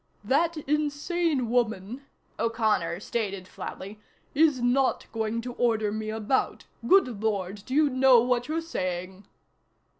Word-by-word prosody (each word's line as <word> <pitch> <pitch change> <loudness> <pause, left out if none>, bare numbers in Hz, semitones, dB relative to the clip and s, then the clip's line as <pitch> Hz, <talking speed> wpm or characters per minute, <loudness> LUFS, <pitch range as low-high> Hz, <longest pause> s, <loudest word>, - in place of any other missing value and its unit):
"That 320 +9 +1
insane 300 -1 0
woman," 235 +2 -1 0.3
O'Connor 220 -7 0
stated 200 -5 -3
flatly, 200 +3 -8 0.3
"is 300 -3 +3
not 250 +2 +1
going 225 0 -2
to 245 +1 -6
order 220 -4 +1
me 215 0 -4
about. 220 +4 -1 0.2
Good 250 - +4
Lord, 200 -2 -2
do 260 - -3
you 305 0 +5
know 260 -2 +5
what 245 0 0
you're 320 +2 -1
saying?" 185 - -4
235 Hz, 125 wpm, -27 LUFS, 210-275 Hz, 0.3 s, you